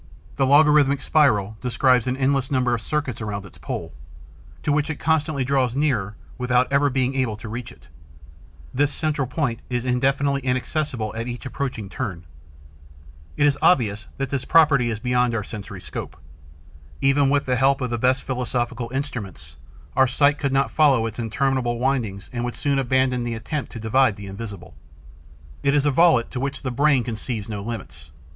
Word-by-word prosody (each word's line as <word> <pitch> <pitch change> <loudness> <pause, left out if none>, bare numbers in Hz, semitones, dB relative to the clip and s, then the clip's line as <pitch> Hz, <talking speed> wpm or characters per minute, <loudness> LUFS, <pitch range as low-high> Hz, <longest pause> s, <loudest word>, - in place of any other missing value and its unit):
The 135 - +2
logarithmic 145 -1 +5
spiral 110 -11 +2
describes 125 -1 +2
an 125 +1 -1
endless 135 -1 +1
number 125 -3 +1
of 115 - -1
circuits 135 -4 -3
around 100 -2 -4
its 90 - -15
pole, 80 -1 -5 0.7
to 150 - +1
which 150 +1 +1
it 160 - -2
constantly 155 -3 +1
draws 130 -2 +1
nearer 120 -9 0 0.2
without 125 0 +2
ever 140 +1 +4
being 130 0 0
able 130 -5 -1
to 110 - -9
reach 115 +2 -6
it. - - -18 0.9
This 145 +3 +2
central 150 -4 -1
point 130 -3 -2
is 125 -1 -2
indefinitely 135 +2 +1
inaccessible 130 -3 -2
at 115 +1 -4
each 120 +3 -6
approaching 130 -5 -4
turn. 95 -6 -5 1.1
It 145 - +3
is 145 0 +2
obvious 110 - +2
that 135 -1 -3
this 140 -3 -1
property 145 -7 +4
is 110 - -2
beyond 125 +1 +1
our 105 - -1
sensory 100 -2 -8
scope. - - -7 0.8
Even 135 0 +3
with 140 0 +2
the 125 - +1
help 135 +2 +3
of 125 -2 -3
the 120 - -1
best 130 +2 +2
philosophical 125 -2 -2
instruments, 110 - -5 0.4
our 130 0 +5
sight 145 +3 +2
could 140 -2 -1
not 135 0 +1
follow 140 -7 +4
its 110 0 -5
interminable 120 +1 0
windings 115 -6 -1
and 120 -1 -2
would 120 0 -3
soon 140 -1 0
abandon 130 -1 +1
the 120 -1 -3
attempt 140 +6 -4
to 115 - -6
divide 115 +1 +2
the 100 - -9
invisible. 100 -1 -8 0.9
It 140 +1 +2
is 145 0 +2
a 145 - +3
volute 160 -5 +4
to 125 - -4
which 140 +1 -4
the 130 - -2
brain 140 0 +3
conceives 115 -2 -4
no 105 -2 -5
limits. 75 - -7
125 Hz, 180 wpm, -23 LUFS, 115-140 Hz, 1.1 s, logarithmic